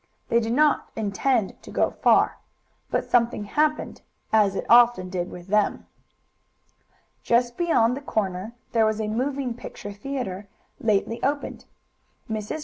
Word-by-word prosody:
They 235 - +4
did 225 0 -1
not 300 +3 +3
intend 220 +1 0
to - - -13
go - - +1
far, - - +3 0.5
but - - 0
something 235 -3 +2
happened, 300 +8 -1 0.3
as 205 -3 +4
it - - -3
often 235 -6 +5
did 180 -1 -2
with 175 -1 -10
them. 210 0 +1 1.4
Just 240 0 +1
beyond 250 -9 +2
the 280 - -6
corner 205 -4 -2 0.2
there 225 -2 +3
was 215 0 -1
a 215 - -1
moving 255 +3 -1
picture 205 -3 -8
theatre, 205 -4 -5 0.3
lately 225 +1 0
opened. 285 +1 -2 0.6
Mrs. 220 +6 -4
225 Hz, 140 wpm, -25 LUFS, 205-255 Hz, 1.4 s, often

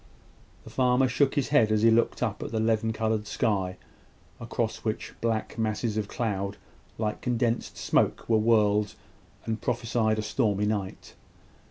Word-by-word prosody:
The - - -12
farmer 125 0 +3
shook 135 +3 +1
his 140 -4 0
head 120 -7 +4
as 110 0 +2
he 115 - +6
looked 115 +2 +2
up 110 -3 -2
at - - -5
the 110 - -1
leaden 110 0 +1
coloured 110 -1 -1
sky, 95 -6 0 0.6
across 115 -1 -2
which 110 -1 -4
black 115 0 -1
masses 110 0 -1
of 110 -2 -1
cloud, 100 -3 -2 0.4
like 105 -1 -2
condensed 120 -1 -1
smoke, - - +1
were 110 -1 +3
whirled, 105 -2 +3 0.5
and 110 -1 -3
prophesied 110 -2 0
a 110 - -1
stormy 105 -3 0
night. 105 -3 -3
110 Hz, 155 wpm, -27 LUFS, 105-115 Hz, 0.6 s, he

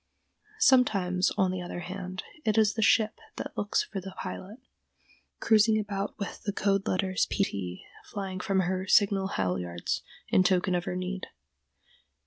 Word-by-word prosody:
Sometimes, 200 - +4
on 190 -3 +3
the 185 -1 -3
other 175 0 -5
hand, 185 +1 -6 0.2
it 215 0 +1
is 215 -2 +4
the 220 - -2
ship 215 0 +3 0.2
that - - -6
looks 205 - +1
for 200 - -6
the 190 +1 -9
pilot, 200 +5 -6 0.8
cruising 215 0 +4
about 200 -1 -3
with 200 - -5
the 210 - -2
code 195 +1 +1
letters 185 0 +1
P 200 - +1
T 95 - -4 0.2
flying 190 -2 -5
from 190 0 +1
her 185 +1 -1
signal 200 -1 +4
halyards 90 - -2 0.3
in - - +5
token 185 0 +2
of 175 0 0
her - - -3
need. 185 +1 -4
190 Hz, 155 wpm, -29 LUFS, 180-205 Hz, 0.8 s, in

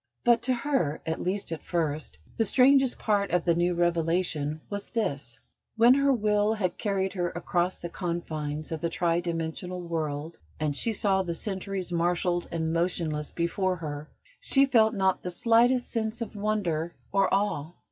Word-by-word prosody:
But 240 -1 +4
to 255 - +1
her, 240 - 0
at 160 0 -2
least 190 0 -2
at 165 - -4
first, 155 - -2 0.2
the 225 - +2
strangest 265 +3 +4
part 205 -3 +1
of 175 0 +1
the 170 - +4
new 175 +1 +1
revelation 165 -3 0
was 205 -1 -5
this: 140 - -3 0.4
When 235 +2 +7
her 280 +1 +3
will 210 -2 +2
had 185 -5 -2
carried 195 -3 -1
her 175 -2 -1
across 175 +1 -1
the 170 - -6
confines 155 -4 -4
of 160 -2 -3
the 170 - 0
tri 170 0 +1
dimensional 170 +1 -3
world, 160 -2 -4 0.2
and 150 -2 -1
she 230 - 0
saw 195 -2 +1
the 170 -3 -3
centuries 190 -2 -4
marshalled 175 +1 0
and 160 -1 -1
motionless 165 -3 -1
before 185 +2 0
her, 150 -3 -6 0.3
she 275 - +4
felt 225 -5 +4
not 190 -1 +1
the 180 - -4
slightest 235 +6 +3
sense 220 0 -2
of 230 -2 -5
wonder 185 -6 -1 0.2
or 195 -1 +2
awe. 175 -7 0
180 Hz, 165 wpm, -27 LUFS, 165-210 Hz, 0.4 s, When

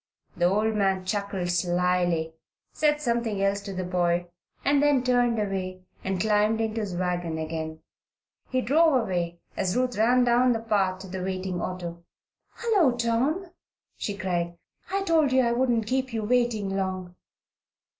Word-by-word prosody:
The 175 - +1
old 210 +4 +2
man 195 -3 +1
chuckled 195 -2 -2
slily, 175 -2 +1 0.4
said 300 -1 +2
something 235 -6 -1
else 200 0 +1
to 200 0 -7
the 185 -1 -3
boy, 175 -1 0 0.4
and 285 0 +4
then 290 -3 +3
turned 245 -2 +2
away 190 -3 -3 0.2
and 190 -1 -1
climbed 215 +2 +2
into 225 0 -1
his 195 -4 -4
wagon 175 -2 -1
again. 160 0 -4 0.7
He 255 -1 +1
drove 305 +1 +4
away 175 -4 -3
as 190 +2 0
Ruth 255 -1 0
ran 245 +3 +4
down 245 +1 +4
the 225 - -1
path 195 -4 0
to 190 - -8
the 190 0 -5
waiting 185 -1 -3
auto. 170 -2 -5 0.5
"Hullo, 380 - +2
Tom!" 265 +11 0 0.4
she 205 -1 -4
cried. 175 -2 -2 0.3
"I 390 +1 0
told 320 -6 +3
you 260 0 +4
I 235 - +2
wouldn't 240 -2 +1
keep 260 +1 -1
you 220 -1 -1
waiting 220 -4 +1
long." 185 -2 -3
200 Hz, 155 wpm, -26 LUFS, 180-245 Hz, 0.7 s, and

